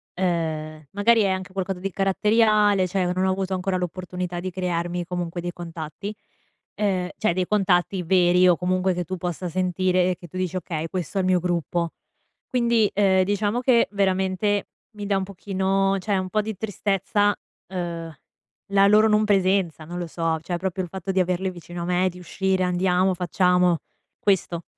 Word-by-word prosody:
ehm, 160 -4 -2
magari 225 +3 +4
è 200 - +2
anche 190 0 -3
qualcosa 190 -1 -3
di 195 +1 -3
caratteriale, 210 0 +3
cioè, 180 -1 0
non 185 +1 0
ho 190 - +2
avuto 190 0 -2
ancora 185 0 -1
l'opportunità 180 0 -4
di 185 +1 -3
crearmi, 175 -1 -2
comunque, 175 -1 -4
dei 175 0 -4
contatti. 170 +4 -7 0.6
Ehm, 190 -3 0
cioè, 215 - +1
dei 185 +1 0
contatti 190 -2 +2
veri 180 +1 +4
o 175 - +6
comunque 185 +1 +1
che 175 0 -2
tu 185 +3 -4
possa 180 +1 -4
sentire 185 +1 +1
e - - -2
che 175 - -12
tu 175 - -16
dici: 185 -1 -2
"Okay, 165 -2 -4
questo 180 +1 -4
è - - +3
il 185 - 0
mio 185 -1 +3
gruppo." 170 -1 -1 0.6
Quindi, 235 -4 +2
ehm, 190 -2 +4
diciamo 205 +4 0
che 245 -2 +4
veramente 190 +1 +1 0.3
mi 205 - -5
dà 195 -1 +2
un 190 - -1
pochino, 195 0 0
cioè, 200 +1 0
un 185 0 -2
po' 215 +2 +1
di 215 -1 -5
tristezza, 205 0 0 0.3
uhm, 170 -3 -4 0.6
la 195 0 +6
loro 215 +1 +6
non 210 0 +3
presenza, 190 -6 +1
non 175 +2 -6
lo 175 - -4
so, 165 0 -1
cioè, 175 +1 -3
proprio 185 +1 -2
il 180 - -7
fatto 190 +1 -4
di 190 - +1
averli 185 +1 -1
vicino 175 0 -8
a - - -3
me, 180 +1 +2
di 180 - -11
uscire, 190 +1 -1
andiamo, 180 +1 +2
facciamo, 180 -1 +2 0.4
questo. 180 -4 +1
185 Hz, 180 wpm, -24 LUFS, 175-195 Hz, 0.6 s, o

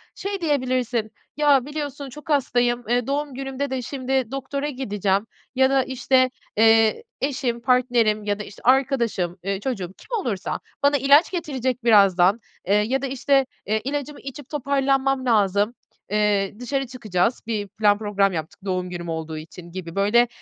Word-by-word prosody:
şey 395 -1 -4
diyebilirsin, 255 -7 0 0.3
"Ya 285 -4 +4
biliyorsun 290 -2 -5
çok 300 +4 -12
hastayım, 245 -4 +1
eee, 245 0 +1
doğum 285 0 -2
günümde 270 +1 -4
de 260 -1 -2
şimdi 260 -1 -2
doktora 275 +2 -3
gideceğim." 205 -6 -1 0.3
ya 265 0 +4
da, 270 -1 +3
işte, 255 0 +2 0.3
eee, 225 - +5 0.2
"Eşim, 255 -4 -1
partnerim 235 -4 +2
ya 205 0 -1
da, 210 - -4
işte, 200 - -13
arkadaşım, 235 -9 +2
eee, 195 0 -2
çocuğum," 195 -6 -4
kim 475 - -4
olursa 210 - -3 0.2
"bana 285 0 +4
ilaç 280 +7 +5
getirecek 260 -8 -2
birazdan, 200 -3 +5 0.3
eee, 200 - +4
ya 225 +6 +1
da, 275 - -2
işte, 270 +1 +2 0.2
eee, 215 +2 0
ilacımı 285 +2 -4
içip 275 0 -9
toparlanmam 270 -2 +1
lazım, 210 -1 +2 0.4
eee, 205 -2 +1
dışarı 270 +1 -2
çıkacağız, 225 -3 -1
bir 210 -3 -2
plan 205 0 +2
program 200 -2 +1
yaptık 160 -2 -5
doğum 185 -1 -2
günüm 175 -1 -6
olduğu 160 -1 -4
için." 170 +2 -10
gibi 170 -2 -7
böyle, 210 +5 +4
245 Hz, 155 wpm, -23 LUFS, 205-270 Hz, 0.4 s, eee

